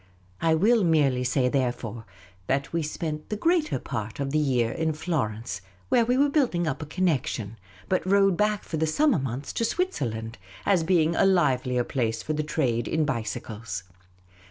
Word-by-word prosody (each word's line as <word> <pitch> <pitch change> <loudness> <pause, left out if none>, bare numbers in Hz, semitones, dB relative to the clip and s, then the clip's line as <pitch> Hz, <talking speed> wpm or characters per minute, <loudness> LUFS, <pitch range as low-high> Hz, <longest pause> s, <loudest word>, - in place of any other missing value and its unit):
I 165 -1 +3
will 215 +6 +4
merely 145 -7 +3
say, 125 +1 +1
therefore, 120 -4 -2 0.4
that 135 +3 -1
we 165 - +1
spent 155 0 -4
the 210 - -1
greater 330 - +1
part 110 -3 -5
of 135 -1 -2
the 155 - +2
year 125 -6 +1
in 160 +3 -1
Florence, 120 - -3 0.3
where 235 - +4
we 250 +2 +2
were 285 +2 +5
building 260 - +1
up 155 - -2
a 155 - -6
connection, 135 - -1 0.3
but 185 - +1
rode 195 0 +4
back 210 +1 +1
for 160 - -4
the 160 +1 +1
summer 275 - +3
months 135 +1 -4
to - - -1
Switzerland, 115 - -2 0.3
as 185 -5 +3
being 165 -1 +2
a - - +3
livelier 130 -9 +2
place 115 -3 -2
for 155 - -2
the 155 - 0
trade 130 -6 0
in 160 -1 +1
bicycles. 110 -6 -4
150 Hz, 175 wpm, -26 LUFS, 125-180 Hz, 0.4 s, were